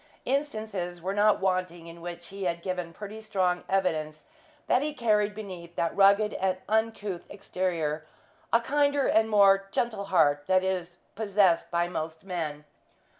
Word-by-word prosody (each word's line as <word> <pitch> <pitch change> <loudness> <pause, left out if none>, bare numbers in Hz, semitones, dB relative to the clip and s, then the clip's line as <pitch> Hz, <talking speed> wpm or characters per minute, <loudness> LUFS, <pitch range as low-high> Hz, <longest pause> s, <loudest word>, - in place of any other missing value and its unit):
Instances 215 -10 -2
were 185 +3 -3
not 205 +1 +4
wanting 185 -3 -1
in 170 0 -11
which 175 0 -7
he 195 0 -6
had 170 -1 -2
given 180 -2 -3
pretty 210 +5 -8
strong 185 -4 0
evidence 160 -5 -1 0.4
that 250 - +3
he 300 0 -3
carried 210 -4 +1
beneath 180 -5 -8
that 165 - -1
rugged 200 +2 +5
and 185 -1 0
uncouth 215 -4 -1
exterior 170 -6 -2 0.4
a 230 - +5
kinder 285 +2 +2
and 220 0 +3
more 195 -2 +5
gentle 220 -3 -1
heart 145 -6 +2
than 185 0 +3
is 180 -2 -2 0.2
possessed 200 -4 +2
by 170 0 +1
most 160 -2 -5
men. 160 -6 -4
190 Hz, 150 wpm, -28 LUFS, 170-210 Hz, 0.4 s, rugged